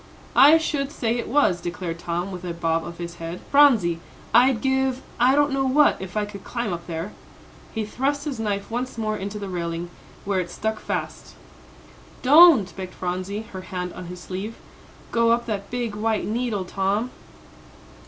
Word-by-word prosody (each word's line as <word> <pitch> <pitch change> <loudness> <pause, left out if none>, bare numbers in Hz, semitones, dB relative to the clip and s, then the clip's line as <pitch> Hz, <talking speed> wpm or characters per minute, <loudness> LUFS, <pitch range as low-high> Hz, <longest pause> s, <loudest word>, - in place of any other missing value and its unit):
"I 295 +4 +8
should 290 -3 -2
say 235 -6 -1
it - - -4
was," 230 -11 +2
declared 175 -1 -4
Tom, 175 +3 -3
with 180 -1 -7
a 175 -2 -4
bob 165 -1 0
of 170 0 -8
his 170 0 -7
head. 165 +1 -6
"Phronsie, 230 - +5 0.3
I'd 255 -2 +5
give, 265 0 0 0.2
I 255 +3 +5
don't 290 0 +3
know 270 0 +1
what, 290 -2 +4
if 190 +1 -6
I 210 - +1
could 200 -2 -10
climb 235 -6 -3
up 170 0 -7
there." 165 +4 -4 0.6
He 220 -2 -3
thrust 280 +7 -1
his 275 -6 -4
knife 205 -1 -2
once 245 +1 -3
more 215 -1 -1
into 200 +1 -5
the 200 -1 -5
railing, 170 -1 -4 0.3
where 195 -1 +1
it 175 -1 -3
stuck 220 +4 -3
fast. - - -5 0.9
"Don't." 270 - +7
begged 185 -1 -7
Phronsie, 185 +4 -3
her 185 - -5
hand 180 -1 -5
on 180 - -8
his 180 +1 -8
sleeve, 190 +5 -5 0.6
"go 230 0 +3
up 235 +1 +2
that 200 -3 -4
big 240 -3 -2
white 215 0 0
needle, 220 -3 -1
Tom." 200 +6 -1
210 Hz, 180 wpm, -24 LUFS, 180-250 Hz, 0.9 s, I